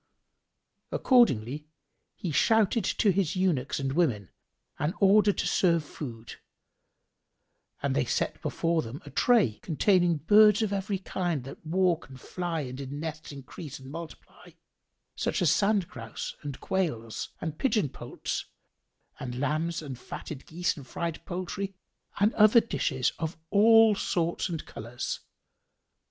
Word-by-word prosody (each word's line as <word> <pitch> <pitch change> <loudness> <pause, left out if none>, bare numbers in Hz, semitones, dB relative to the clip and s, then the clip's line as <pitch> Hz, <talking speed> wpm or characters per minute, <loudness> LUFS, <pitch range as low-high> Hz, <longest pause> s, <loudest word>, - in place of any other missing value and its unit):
Accordingly 150 - +3 0.5
he 185 -6 -4
shouted 220 - +3
to 205 0 +2
his 190 -3 0
eunuchs 180 -10 0
and 135 -1 -2
women 125 - 0 0.5
an 155 +6 -1
order 205 +1 +6
to - - -2
serve 170 -4 +2
food, 120 -6 -8 1.5
and - - +1
they - - +1
set - - -1
before 165 -1 0
them 120 +3 -7
a 145 - -10
tray 220 - +3
containing 175 0 +2
birds 210 +7 +6
of 205 -2 -1
every 195 0 -1
king 175 -6 -2
that 135 - -10
walk 170 -5 +1
and 130 -1 -11
fly 175 +2 -3
and 130 0 -6
in 140 +2 -6
nests 155 0 -6
increase 140 +1 -9
and 130 0 -11
multiply, 165 -1 -10 0.7
such - - -1
as 170 -5 +4
sand 200 +1 +2
grouse 115 -3 -7
and 145 -3 -6
quails 135 - -2
and 155 -2 -5
pigeon 225 - +2
poults - - -5 0.7
and 125 -1 -5
lambs 155 +4 -1
and 135 -5 -7
fatted 140 +1 -8
geese 175 +2 -1
and 140 -4 -11
fried 165 +5 -4
poultry 185 +2 -4 0.4
and 210 +3 +3
other 215 +2 +7
dishes 135 - -1
of 160 0 -3
all 225 +1 +7
sorts 170 -2 -1
and 165 -3 -4
colours. 120 +2 -5
165 Hz, 140 wpm, -28 LUFS, 140-195 Hz, 1.5 s, other